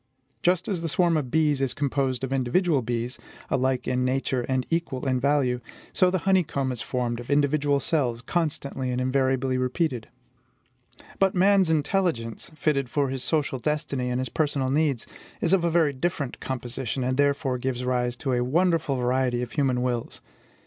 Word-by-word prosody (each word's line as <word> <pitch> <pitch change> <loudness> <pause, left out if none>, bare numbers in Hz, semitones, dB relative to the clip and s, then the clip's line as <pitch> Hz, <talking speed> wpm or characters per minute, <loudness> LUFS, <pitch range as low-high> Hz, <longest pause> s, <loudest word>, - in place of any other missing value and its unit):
Just 180 0 +2
as 190 -5 -1
the 165 - -2
swarm 170 +1 +2
of 145 -5 -1
bees 150 -1 +2
is 135 -2 -1
composed 135 -2 -1
of 135 0 -2
individual 135 +4 +2
bees, 120 +1 -3 0.3
alike 130 -1 +1
in 125 0 +1
nature 130 0 0
and 130 -1 0
equal 155 -5 -1
in 130 -1 +1
value, 130 -2 +1 0.3
so 185 - +4
the 185 - +1
honeycomb 165 -8 +2
is 125 -2 -4
formed 120 -2 -2
of 120 - -9
individual 145 0 +2
cells, 125 -5 -1
constantly 140 -4 -2
and 125 0 -1
invariably 130 0 +1
repeated. 130 -2 -1 1.1
But 195 0 +3
man's 190 -1 +4
intelligence, 155 - 0
fitted 140 -5 0
for 140 0 0
his 130 -1 -3
social 145 -4 0
destiny 140 -3 -1
and 125 0 -1
his 130 - -2
personal 140 -4 0
needs, 145 -4 +1 0.3
is 170 - +2
of 190 -3 +3
a 170 - +2
very 160 -3 +3
different 140 -2 -2
composition, 130 0 -3
and 130 +1 0
therefore 140 -2 +1
gives 125 0 -2
rise 125 -1 0
to 130 +2 -2
a 125 0 +1
wonderful 160 +1 +1
variety 125 -1 +1
of 120 - -6
human 130 -4 +1
wills. 120 -2 -2
135 Hz, 170 wpm, -26 LUFS, 125-155 Hz, 1.1 s, so